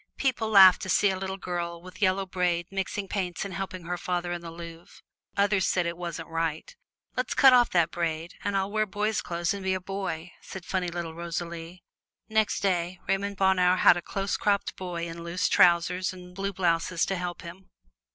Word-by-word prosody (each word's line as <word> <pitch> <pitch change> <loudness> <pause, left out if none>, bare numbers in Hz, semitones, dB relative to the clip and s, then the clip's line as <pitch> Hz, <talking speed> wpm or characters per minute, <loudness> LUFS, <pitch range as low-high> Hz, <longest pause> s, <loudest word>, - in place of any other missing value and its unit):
People 245 -5 0
laughed 190 -3 +8
to 190 - -5
see 200 +1 +4
a - - -2
little 190 +1 -4
girl 175 -2 -4
with 185 +2 -13
yellow 190 0 +2
braid 180 -2 0
mixing 195 +1 -3
paints 180 -3 -3
and 195 - -6
helping 185 0 -5
her 175 +1 -3
father 175 -1 -2
in 175 -1 -3
the 170 - -8
Louvre; 165 0 -11 0.3
others 200 -1 +2
said 180 -2 +1
it 170 0 -2
wasn't 170 -2 -6
right. 165 -1 -3 0.4
"Let's 255 -1 -2
cut 265 -2 +7
off 245 -1 +5
the 170 -3 +3
braid, 165 0 -3
and 200 -1 0
I'll 195 +1 -1
wear 215 0 +1
boy's 210 +1 -1
clothes 170 +1 -2
and 200 -1 -6
be 190 0 +1
a - - -2
boy," 185 -3 -5
said 190 -2 -9
funny 185 -2 -1
little 170 -1 -4
Rosalie. 170 +1 -6 0.4
Next 220 -1 +1
day, 180 -2 0
Raymond 200 +1 -1
Bonheur 185 -1 +4
had - - +6
a 175 - -3
close 195 +2 -2
cropped 200 -1 0
boy 175 -2 -4
in 170 0 -7
loose 170 +2 -1
trousers 180 +1 +3
and 180 -1 -12
blue 195 +2 -3
blouse 170 -2 +1
to 195 - -2
help 180 -1 -5
him. 180 +2 -11
180 Hz, 200 wpm, -27 LUFS, 170-195 Hz, 0.4 s, laughed